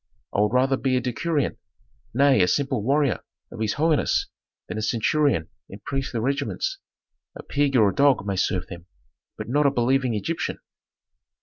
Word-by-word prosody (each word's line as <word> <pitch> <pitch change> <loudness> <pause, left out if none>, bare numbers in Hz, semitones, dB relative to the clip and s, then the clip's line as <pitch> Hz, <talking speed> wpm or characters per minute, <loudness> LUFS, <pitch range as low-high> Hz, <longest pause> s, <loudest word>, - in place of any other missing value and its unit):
I - - 0
would 105 +2 +1
rather 130 +1 +3
be 130 -1 +1
a - - +2
decurion, 140 +5 -1 0.5
nay 135 -2 +4
a 90 - +4
simple 135 0 0
warrior 140 +2 +1 0.3
of - - -9
his 110 -2 0
holiness 155 0 +1 0.4
than 110 - -4
a - - -3
centurion 115 - +1 0.2
in 100 - -10
priestly 135 -4 -2
regiments; 140 - -2 0.6
a - - -9
pig 140 -1 0
or 110 -5 +5
a - - -3
dog 140 -7 +3
may 100 -1 -1
serve 90 -1 0
them, 85 -1 -11 0.5
but - - -6
not 145 +4 +2
a - - +5
believing 130 -1 +1
Egyptian!" 160 +11 -2
130 Hz, 170 wpm, -24 LUFS, 110-140 Hz, 0.6 s, or